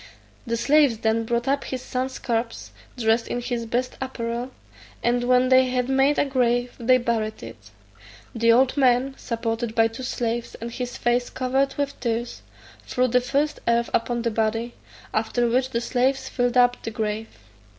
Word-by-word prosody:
The 230 Hz, 0 st, 0 dB
slaves 280 Hz, -1 st, +4 dB
then 225 Hz, +1 st, 0 dB
brought 235 Hz, +2 st, -1 dB
up 280 Hz, +1 st, +1 dB
his 255 Hz, -1 st, -5 dB
son's 260 Hz, +1 st, -3 dB
corpse, 230 Hz, -1 st, -3 dB, 0.3 s
dressed 225 Hz, 0 st, +1 dB
in 245 Hz, -, -2 dB
his 240 Hz, -1 st, -3 dB
best 245 Hz, +3 st, -2 dB
apparel, 240 Hz, -1 st, -3 dB, 0.5 s
and 245 Hz, +1 st, +2 dB
when 250 Hz, +1 st, +4 dB
they 260 Hz, 0 st, +5 dB
had 250 Hz, 0 st, -1 dB
made 270 Hz, +2 st, +3 dB
a -, -, +3 dB
grave 245 Hz, -2 st, +1 dB
they 255 Hz, +2 st, +4 dB
buried 230 Hz, -3 st, -2 dB
it. -, -, -11 dB, 0.6 s
The 230 Hz, 0 st, +3 dB
old 255 Hz, +2 st, +4 dB
man, 260 Hz, 0 st, +3 dB
supported 230 Hz, -1 st, -3 dB
by 225 Hz, -1 st, +4 dB
two 225 Hz, +3 st, -9 dB
slaves, 240 Hz, -2 st, -3 dB
and 230 Hz, +1 st, -7 dB
his 245 Hz, 0 st, -5 dB
face 240 Hz, +1 st, +1 dB
covered 265 Hz, +1 st, 0 dB
with 285 Hz, -1 st, -3 dB
tears, 235 Hz, 0 st, -3 dB, 0.5 s
threw 255 Hz, 0 st, +1 dB
the 250 Hz, +1 st, +3 dB
first 280 Hz, +4 st, 0 dB
earth 235 Hz, 0 st, +2 dB
upon 235 Hz, 0 st, 0 dB
the 235 Hz, -, 0 dB
body, 225 Hz, +2 st, -1 dB, 0.4 s
after 225 Hz, +2 st, +1 dB
which 255 Hz, +2 st, +1 dB
the 235 Hz, -2 st, -2 dB
slaves 260 Hz, +2 st, 0 dB
filled 245 Hz, -1 st, 0 dB
up 245 Hz, 0 st, +4 dB
the -, -, -4 dB
grave. 215 Hz, 0 st, -3 dB
245 Hz, 170 wpm, -24 LUFS, 230-255 Hz, 0.6 s, they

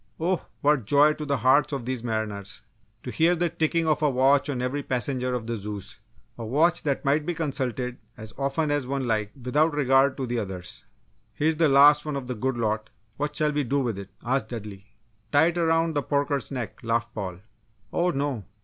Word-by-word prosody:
Oh, 175 Hz, +2 st, -1 dB
what 145 Hz, -5 st, +2 dB
joy 145 Hz, +6 st, +5 dB
to 150 Hz, -, -6 dB
the 140 Hz, -1 st, +1 dB
hearts 130 Hz, +5 st, +3 dB
of 135 Hz, -4 st, -4 dB
these 130 Hz, -2 st, -3 dB
mariners! 110 Hz, -3 st, -4 dB, 0.4 s
To 125 Hz, -, -5 dB
hear 165 Hz, +5 st, +3 dB
the 175 Hz, 0 st, 0 dB
ticking 165 Hz, 0 st, 0 dB
of 155 Hz, -1 st, +2 dB
a 150 Hz, -, +3 dB
watch 135 Hz, +2 st, +3 dB
on 135 Hz, -3 st, -2 dB
every 125 Hz, +3 st, -2 dB
passenger 125 Hz, -1 st, -2 dB
of 120 Hz, -2 st, -4 dB
the 115 Hz, 0 st, -3 dB
Zeus 105 Hz, 0 st, -7 dB, 0.4 s
a -, -, -4 dB
watch 160 Hz, +10 st, +2 dB
that 140 Hz, -1 st, -2 dB
might 145 Hz, +2 st, +2 dB
be 175 Hz, +2 st, -3 dB
consulted 130 Hz, -5 st, -2 dB, 0.2 s
as 110 Hz, 0 st, -9 dB
often 140 Hz, +3 st, -1 dB
as 145 Hz, -3 st, 0 dB
one 135 Hz, 0 st, -2 dB
liked 110 Hz, -1 st, -1 dB
without 145 Hz, +5 st, +1 dB
regard 135 Hz, -1 st, +3 dB
to 135 Hz, -, -2 dB
the 120 Hz, -1 st, -2 dB
others! 95 Hz, +2 st, -6 dB, 0.5 s
"Here's 155 Hz, +4 st, +1 dB
the 160 Hz, -2 st, +4 dB
last 145 Hz, +2 st, +7 dB
one 150 Hz, -2 st, -4 dB
of 135 Hz, -2 st, -4 dB
the 125 Hz, -, -3 dB
good 125 Hz, +2 st, -2 dB
lot; 110 Hz, -1 st, -1 dB, 0.3 s
what 150 Hz, +1 st, -2 dB
shall 150 Hz, -1 st, +1 dB
we 145 Hz, 0 st, 0 dB
do 140 Hz, +3 st, 0 dB
with 115 Hz, -6 st, -2 dB
it?" 100 Hz, 0 st, -9 dB, 0.2 s
asked 125 Hz, -2 st, 0 dB
Dudley. 105 Hz, -4 st, -8 dB, 0.4 s
"Tie 145 Hz, +2 st, +6 dB
it 175 Hz, -, -5 dB
around 165 Hz, 0 st, +2 dB
the 145 Hz, -, +1 dB
porker's 140 Hz, 0 st, -1 dB
neck!" 125 Hz, -5 st, -5 dB
laughed 115 Hz, +1 st, -1 dB
Paul. 95 Hz, -5 st, -5 dB, 0.6 s
"Oh, 175 Hz, +1 st, +2 dB
no! 140 Hz, -, -2 dB
135 Hz, 205 wpm, -26 LUFS, 115-150 Hz, 0.6 s, last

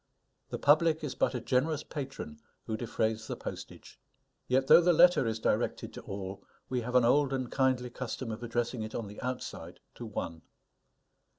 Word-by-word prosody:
The -, -, -3 dB
public 155 Hz, +2 st, +4 dB
is 150 Hz, -, -3 dB
but -, -, +1 dB
a -, -, -1 dB
generous 140 Hz, +6 st, 0 dB
patron 150 Hz, -, -6 dB, 0.3 s
who 110 Hz, -, -2 dB
defrays 110 Hz, -1 st, -1 dB
the -, -, -3 dB
postage. -, -, -9 dB, 0.5 s
Yet 130 Hz, +1 st, +2 dB
though 170 Hz, -, +8 dB
the 175 Hz, +1 st, +4 dB
letter 170 Hz, -6 st, +6 dB
is 110 Hz, -1 st, -1 dB
directed -, -, -1 dB
to -, -, -8 dB
all, 95 Hz, 0 st, -6 dB, 0.3 s
we 125 Hz, -1 st, 0 dB
have 125 Hz, +2 st, -4 dB
an 125 Hz, -2 st, +6 dB
old 140 Hz, +3 st, +4 dB
and 130 Hz, -2 st, -2 dB
kindly 130 Hz, -2 st, +1 dB
custom 125 Hz, -1 st, -5 dB
of 110 Hz, +2 st, -6 dB
addressing 120 Hz, 0 st, -2 dB
it 110 Hz, 0 st, -5 dB
on 115 Hz, -, -3 dB
the 105 Hz, +1 st, -9 dB
outside 125 Hz, 0 st, -5 dB
to 120 Hz, -, -8 dB
one. 85 Hz, -6 st, -5 dB
125 Hz, 180 wpm, -31 LUFS, 110-140 Hz, 0.5 s, though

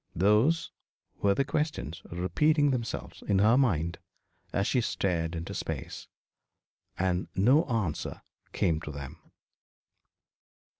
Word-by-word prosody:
Those 105 Hz, -, +3 dB, 0.5 s
were 100 Hz, -1 st, +3 dB
the 140 Hz, -, +1 dB
questions 150 Hz, -, -2 dB
repeating 145 Hz, -, +2 dB
themselves 120 Hz, -5 st, -4 dB
in 100 Hz, -, +1 dB
her 105 Hz, +4 st, +5 dB
mind 85 Hz, -, +1 dB, 0.5 s
as 100 Hz, -, 0 dB
she 125 Hz, -, +2 dB
stared 85 Hz, -6 st, -1 dB
into 80 Hz, +1 st, -5 dB
space. -, -, -5 dB, 0.9 s
And 90 Hz, -1 st, 0 dB
no 125 Hz, +11 st, +4 dB
answer 110 Hz, -, -2 dB, 0.3 s
came 80 Hz, -2 st, +1 dB
to 75 Hz, -, -6 dB
them. 70 Hz, +2 st, -8 dB
100 Hz, 110 wpm, -29 LUFS, 85-130 Hz, 0.9 s, her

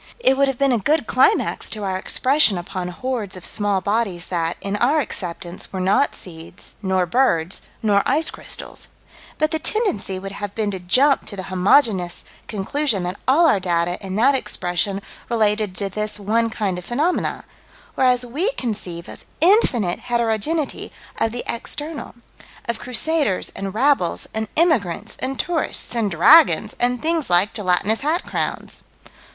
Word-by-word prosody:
It 265 Hz, -, +3 dB
would 275 Hz, +1 st, +3 dB
have 270 Hz, -2 st, -2 dB
been 275 Hz, 0 st, +2 dB
a 240 Hz, -, +2 dB
good 295 Hz, +5 st, +1 dB
climax 260 Hz, -, +2 dB
to 215 Hz, -2 st, -4 dB
our 190 Hz, -1 st, -1 dB
expression 255 Hz, +2 st, +3 dB
upon 180 Hz, +1 st, -5 dB
hordes 210 Hz, +1 st, -4 dB
of 185 Hz, -, -9 dB
small 205 Hz, -3 st, 0 dB
bodies 200 Hz, -4 st, -1 dB
that, 170 Hz, -2 st, -1 dB
in 200 Hz, +1 st, -3 dB
our 275 Hz, +8 st, +3 dB
acceptance, 180 Hz, -, -4 dB
were 190 Hz, -, -4 dB
not 190 Hz, +9 st, +2 dB
seeds, 165 Hz, 0 st, -11 dB
nor 190 Hz, -2 st, +1 dB
birds, 175 Hz, -4 st, +1 dB, 0.2 s
nor 205 Hz, -2 st, +3 dB
ice 305 Hz, +4 st, +2 dB
crystals: -, -, -6 dB, 0.5 s
but 310 Hz, 0 st, +1 dB
the 315 Hz, -, -1 dB
tendency 310 Hz, -, +1 dB
would 195 Hz, +1 st, -7 dB
have 205 Hz, 0 st, -6 dB
been 215 Hz, -2 st, -1 dB
to 190 Hz, -, -4 dB
jump 260 Hz, +11 st, +3 dB
to 205 Hz, -, -5 dB
the 190 Hz, -, -5 dB
homogeneous 185 Hz, -2 st, +2 dB, 0.2 s
conclusion 215 Hz, +1 st, -1 dB
that 180 Hz, +2 st, -4 dB
all 300 Hz, +6 st, +5 dB
our 255 Hz, -11 st, +4 dB
data 175 Hz, 0 st, -1 dB
in 190 Hz, -1 st, -5 dB
that 250 Hz, +7 st, +4 dB
expression 195 Hz, -5 st, -1 dB, 0.3 s
related 210 Hz, -4 st, +1 dB
to 200 Hz, -, -2 dB
this 210 Hz, +2 st, -2 dB
one 225 Hz, +3 st, +1 dB
kind 200 Hz, -5 st, -2 dB
of 180 Hz, -, -11 dB
phenomena, 300 Hz, -, -1 dB, 0.5 s
whereas 250 Hz, -1 st, +2 dB
we 300 Hz, -, -1 dB
conceive 190 Hz, -, -4 dB
of -, -, -12 dB
infinite 280 Hz, -, +3 dB
heterogeneity 240 Hz, +6 st, -1 dB, 0.3 s
of 225 Hz, -, +1 dB
the 240 Hz, +1 st, -4 dB
external: 295 Hz, +6 st, -4 dB, 0.5 s
of 235 Hz, -1 st, -2 dB
crusaders 255 Hz, -, 0 dB
and 195 Hz, 0 st, -5 dB
rabbles 260 Hz, -7 st, +1 dB
and 220 Hz, 0 st, -2 dB
emigrants 275 Hz, -, +1 dB
and 265 Hz, +1 st, -3 dB
tourists 335 Hz, -7 st, -1 dB
and 225 Hz, -3 st, +1 dB
dragons 215 Hz, -, +5 dB
and 245 Hz, 0 st, 0 dB
things 325 Hz, -2 st, 0 dB
like 180 Hz, +4 st, +3 dB
gelatinous 205 Hz, +1 st, +1 dB
hat 320 Hz, +5 st, 0 dB
crowns. -, -, -4 dB
215 Hz, 160 wpm, -21 LUFS, 190-270 Hz, 0.5 s, all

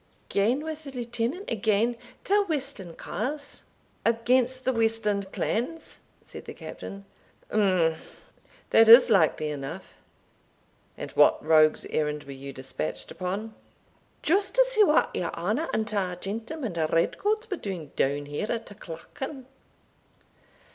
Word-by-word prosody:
"Gane 230 Hz, +8 st, +2 dB
wi' 315 Hz, -, -2 dB
the 305 Hz, -2 st, -10 dB
Lieutenant 245 Hz, -, -3 dB
agane 220 Hz, +2 st, +1 dB, 0.3 s
ta 410 Hz, +1 st, +3 dB
westland 275 Hz, -, -3 dB
carles." 285 Hz, +6 st, -4 dB, 0.4 s
"Against 250 Hz, +3 st, +2 dB
the 260 Hz, -, +2 dB
westland 220 Hz, -4 st, 0 dB
clans?" 310 Hz, +8 st, -3 dB, 0.3 s
said -, -, -10 dB
the -, -, -8 dB
Captain. 195 Hz, 0 st, -8 dB, 0.5 s
"Umph 185 Hz, -6 st, 0 dB, 0.4 s
that 225 Hz, 0 st, +6 dB
is 235 Hz, +1 st, +10 dB
likely 160 Hz, -5 st, +3 dB
enough; 135 Hz, -2 st, -7 dB, 1.0 s
and -, -, -6 dB
what -, -, +4 dB
rogue's 155 Hz, -1 st, +5 dB
errand 150 Hz, -1 st, -1 dB
were 140 Hz, -, -10 dB
you 135 Hz, +1 st, -8 dB
despatched 130 Hz, -, -4 dB
upon?" 200 Hz, +5 st, -4 dB, 0.7 s
"Just 390 Hz, +7 st, +2 dB
to -, -, +7 dB
see 435 Hz, -4 st, +5 dB
what 310 Hz, -5 st, +3 dB
your 180 Hz, -, -1 dB
honour 215 Hz, -, -1 dB
and 220 Hz, -1 st, 0 dB
ta 195 Hz, -4 st, -1 dB
gentlemen 225 Hz, -, -4 dB, 0.2 s
red 165 Hz, -, +1 dB
coats 430 Hz, +2 st, 0 dB
were 380 Hz, -, -1 dB
doing 180 Hz, -, -6 dB
doun 145 Hz, +2 st, 0 dB
here 145 Hz, +9 st, -3 dB
at 230 Hz, -1 st, -2 dB
ta -, -, -11 dB
Clachan." 250 Hz, -, -8 dB
220 Hz, 135 wpm, -27 LUFS, 175-265 Hz, 1.0 s, is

